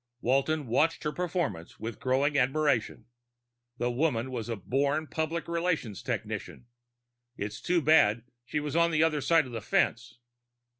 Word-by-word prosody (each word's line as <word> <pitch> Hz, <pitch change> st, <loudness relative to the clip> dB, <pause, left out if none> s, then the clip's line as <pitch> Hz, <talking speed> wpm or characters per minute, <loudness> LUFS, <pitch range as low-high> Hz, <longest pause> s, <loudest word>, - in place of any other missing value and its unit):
Walton 135 Hz, +5 st, +1 dB
watched 145 Hz, +8 st, +1 dB
her 150 Hz, -, -1 dB
performance 170 Hz, -, -3 dB
with 110 Hz, +1 st, -6 dB
growing 135 Hz, +3 st, +1 dB
admiration. 135 Hz, -2 st, +1 dB, 0.7 s
The 120 Hz, 0 st, 0 dB
woman 130 Hz, -2 st, 0 dB
was 120 Hz, -2 st, -4 dB
a 115 Hz, -, -1 dB
born 140 Hz, -, 0 dB
public 160 Hz, +2 st, -3 dB
relations 170 Hz, -, -1 dB
technician. -, -, -4 dB, 0.7 s
It -, -, -3 dB
was 105 Hz, +1 st, -6 dB
too 175 Hz, -2 st, +1 dB
bad 120 Hz, -8 st, +4 dB, 0.2 s
she 150 Hz, +5 st, -2 dB
was 150 Hz, 0 st, -4 dB
on 170 Hz, 0 st, +4 dB
the 160 Hz, -1 st, +3 dB
other 155 Hz, -2 st, +1 dB
side 165 Hz, +1 st, +4 dB
of 125 Hz, -, -9 dB
the 115 Hz, -2 st, -4 dB
fence. 115 Hz, +3 st, 0 dB
140 Hz, 155 wpm, -29 LUFS, 120-160 Hz, 0.7 s, bad